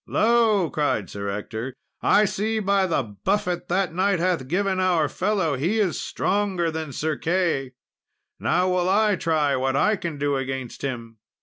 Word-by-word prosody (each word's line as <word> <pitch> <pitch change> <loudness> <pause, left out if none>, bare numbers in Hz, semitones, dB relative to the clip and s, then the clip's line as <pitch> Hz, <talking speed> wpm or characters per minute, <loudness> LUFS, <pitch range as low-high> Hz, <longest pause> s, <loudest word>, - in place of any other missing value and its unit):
"Lo!" 220 -5 +3
cried 145 - -1
Sir 100 0 -4
Ector, 110 +5 -5 0.3
"I 210 +1 +4
see 215 +3 -1
by 200 -2 +2
the 160 -5 +1 0.2
buffet 180 -3 0
that 185 -1 0
knight 190 +2 +2
hath 170 -6 0
given 190 +4 0
our 175 -5 +2
fellow 185 -1 0
he 175 +12 0
is 190 -6 0
stronger 190 -4 0
than 160 -2 -5
Sir 155 +3 -2
Key. 165 -6 0 0.7
Now 180 +3 +1
will 180 0 +1
I 210 +1 +3
try 155 -5 +1
what 130 +1 0
I 210 +9 +3
can 170 -6 -5
do 140 -1 0
against 130 -2 -5
him!" 115 -4 -5
175 Hz, 165 wpm, -24 LUFS, 140-195 Hz, 0.7 s, I